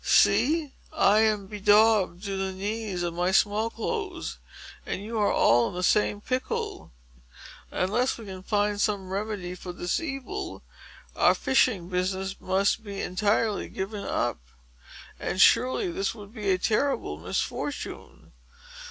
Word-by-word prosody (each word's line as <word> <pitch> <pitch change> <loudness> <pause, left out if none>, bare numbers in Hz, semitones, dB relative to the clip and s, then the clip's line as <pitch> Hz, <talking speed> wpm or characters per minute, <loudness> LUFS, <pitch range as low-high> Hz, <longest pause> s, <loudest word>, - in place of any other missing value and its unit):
See! 300 +1 +3 0.2
I 215 -9 +4
am 215 -2 +2
bedaubed 205 -2 +3
to 200 -2 -3
the 190 0 -2
knees 200 -1 -3
of 170 -1 -2
my 175 +2 0
small 210 +3 +2
clothes, 375 - -4 0.4
and 195 - -4
you 225 +1 -3
are 205 - +3
all 120 +1 +4
in - - -9
the 180 - -3
same 205 +2 +2
pickle. 255 +3 -3 0.8
Unless 235 +8 0
we 230 - -10
can 190 -2 -8
find 205 +1 0
some 200 -3 -1
remedy 200 -3 -3
for 180 0 -7
this 175 0 -1
evil, 335 +6 -5 0.5
our - - +4
fishing 225 -9 +2
business 190 +1 -2
must 195 +4 +1
be 200 -2 -6
entirely 210 +3 0
given 200 +1 -5
up. - - -1 0.8
And, 185 - -3
surely, 260 - +4
this 380 -6 -2
would 205 -1 -12
be 210 -4 -3
a 185 - +4
terrible 210 - 0
misfortune!" 90 +3 -4
205 Hz, 140 wpm, -27 LUFS, 190-225 Hz, 0.8 s, I